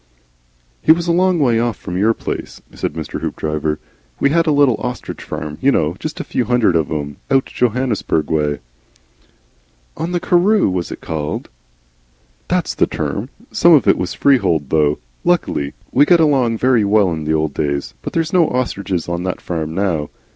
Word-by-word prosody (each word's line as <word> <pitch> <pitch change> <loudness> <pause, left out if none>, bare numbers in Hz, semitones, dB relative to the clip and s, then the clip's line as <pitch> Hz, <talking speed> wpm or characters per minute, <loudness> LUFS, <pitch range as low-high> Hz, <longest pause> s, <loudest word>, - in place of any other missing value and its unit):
"He - - +5
was 170 +1 +3
a - - +3
long 180 +1 +3
way 120 -7 +2
off 115 -3 -1
from 90 - -6
our 115 +1 +3
place," - - -5
said - - -3
Mr. 80 -2 -5
Hoopdriver. 75 0 -2 0.4
"We 140 - +2
had 165 +1 +2
a - - +4
little 140 -6 +4
ostrich 125 -1 -5
farm, 75 -1 -6
you 140 - +4
know 80 - +1
Just 155 0 -5
a - - -2
few 125 - -1
hundred 120 -6 +2
of 80 -3 +1
'em, 75 -2 -4
out 135 -1 +3
Johannesburg 120 -9 -1
way." 75 -2 0 1.3
"On 165 +3 -3
the 175 - 0
Karroo 180 - +3
was 90 -2 -3
it - - -7
called?" 80 -1 -4 1.0
"That's - - 0
the - - +2
term. - - -3 0.2
Some - - +5
of - - +4
it - - +6
was - - -3
freehold 90 - +2
though. 75 -2 +2 0.3
Luckily. 70 0 0 0.2
We 140 +3 +5
got 175 +2 +5
along 135 -7 +3
very 125 -2 +3
well 100 -2 +3
in 80 -2 -4
the 80 +1 +1
old 80 -2 -1
days. 70 -3 -2
But - - -6
there's 165 -1 -1
no 175 -3 +4
ostriches 100 -8 -2
on 85 0 -2
that 90 - -2
farm 80 -2 -4
now." 85 -6 -1
105 Hz, 185 wpm, -18 LUFS, -, 1.3 s, it